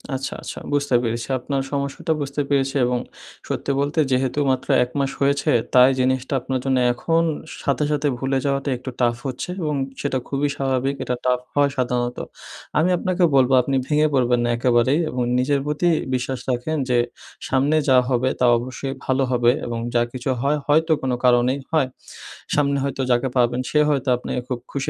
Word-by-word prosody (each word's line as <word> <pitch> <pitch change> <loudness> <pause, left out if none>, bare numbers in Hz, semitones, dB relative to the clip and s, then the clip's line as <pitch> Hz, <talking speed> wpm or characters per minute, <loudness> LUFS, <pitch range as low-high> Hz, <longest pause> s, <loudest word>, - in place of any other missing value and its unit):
আচ্ছা, 135 +1 -4
আচ্ছা। - - -7
বুঝতে 145 -2 +1
পেরেছি। 115 0 -2
আপনার 135 +2 -2
সমস্যাটা 140 +3 -2
বুঝতে 140 +1 -2
পেরেছি 135 -1 +1
এবং 125 0 0 0.5
সত্যি - - -2
বলতে, 145 +3 0
যেহেতু 130 +2 +1
মাত্র 130 0 -2 0.2
১ 125 - -6
মাস 135 0 0
হয়েছে, 140 0 +2 0.2
তাই 125 0 +7
জিনিসটা 130 +1 0
আপনার 130 +1 -2
জন্য, 135 -1 +2 0.2
এখন 165 +6 +1 0.4
সাথে, 140 +1 0
সাথে 150 0 0
ভুলে 135 +1 0
যাওয়াটা 140 0 0
একটু 130 +2 -7
tough 120 -1 +1
হচ্ছে 130 +6 -5
এবং 150 -2 -1 0.3
সেটা 140 -2 -1
খুবই 140 +1 0
স্বাভাবিক। 135 0 0
এটা 125 - -2
tough 125 0 +1
হয় 145 0 +4
সাধারণত। 125 -1 -1 0.6
আমি 160 +4 +3
আপনাকে 185 +1 0
বলব, 130 -1 +4
আপনি 135 +2 -2
ভেঙে 150 0 +3
পড়বেন 125 -2 +2
না 120 - 0
একেবারেই 125 +4 +2
এবং 125 - -3 0.2
নিজের 140 +2 +1
প্রতি 150 +4 0 0.3
বিশ্বাস 130 +1 -3
রাখেন 125 +6 -1
যে, 125 - +3 0.5
সামনে 135 +4 +2
যা 130 - +6
হবে 130 0 +1
তা 125 - +3
অবশ্যই 130 +3 -5
ভালো 130 +1 +1
হবে 120 -1 +4
এবং 115 -1 -3 0.2
যা 120 - +4
কিছু 130 +1 -4
হয়, 145 +3 +1
হয়তো 160 +3 +3
কোন 130 - -1
কারণেই 125 +2 +3
হয়। 155 -5 +2 0.7
সামনে 140 -1 +2
হয়তো 135 -1 -2
যাকে 120 +2 +2
পাবেন, 120 0 +2
সে 150 - +2
হয়তো 140 -3 0
আপনাকে 125 - -4
খুব 125 - -2
খুশি 140 -1 -2
135 Hz, 180 wpm, -22 LUFS, 125-140 Hz, 0.7 s, তাই